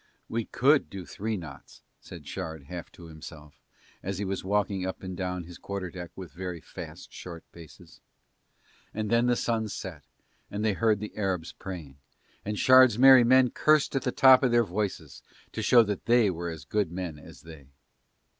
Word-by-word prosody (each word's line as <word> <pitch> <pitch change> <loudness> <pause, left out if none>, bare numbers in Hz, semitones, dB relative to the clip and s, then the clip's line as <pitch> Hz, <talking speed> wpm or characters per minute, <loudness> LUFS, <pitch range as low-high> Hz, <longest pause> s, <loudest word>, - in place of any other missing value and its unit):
"We 115 -1 -2
could 140 +3 +2
do 95 -3 -8
three 110 +4 -4
knots," 80 -6 -11 0.2
said - - -12
Shard 80 -2 -6
half 85 +3 -8
to 85 - -13
himself 80 -2 -12 0.4
as 95 0 -4
he 100 - -3
was 95 0 -3
walking 100 -1 0
up 95 +1 -5
and 95 -1 -5
down 90 -1 -3
his 85 +1 -12
quarter 100 -3 -5
deck 90 -2 -8
with 95 -3 -9
very 90 -1 -6
fast - - -10
short 85 -2 -9
paces. 85 -3 -15 0.9
And 110 0 -3
then 120 +1 +3
the 120 - +3
sun 115 -2 -1
set 90 -6 -7 0.5
and 105 +2 -3
they 110 - +2
heard 110 0 +1
the 105 - -7
Arabs 95 -5 -2
praying 80 -8 -9 0.4
and 105 +1 -4
Shard's 130 -2 +6
merry 130 0 +8
men 130 +1 +5
cursed 155 -2 +2
at 135 - +1
the 125 - -1
top 130 0 +7
of 130 - +2
their 120 0 +4
voices 105 0 -4 0.3
to - - -4
show 120 -2 +6
that 105 -3 -4
they 115 -4 +4
were 85 0 -5
as 80 -2 -8
good 105 -6 -1
men 85 -4 -5
as 70 - -14
they. 80 -5 -13
95 Hz, 185 wpm, -28 LUFS, 85-115 Hz, 0.9 s, merry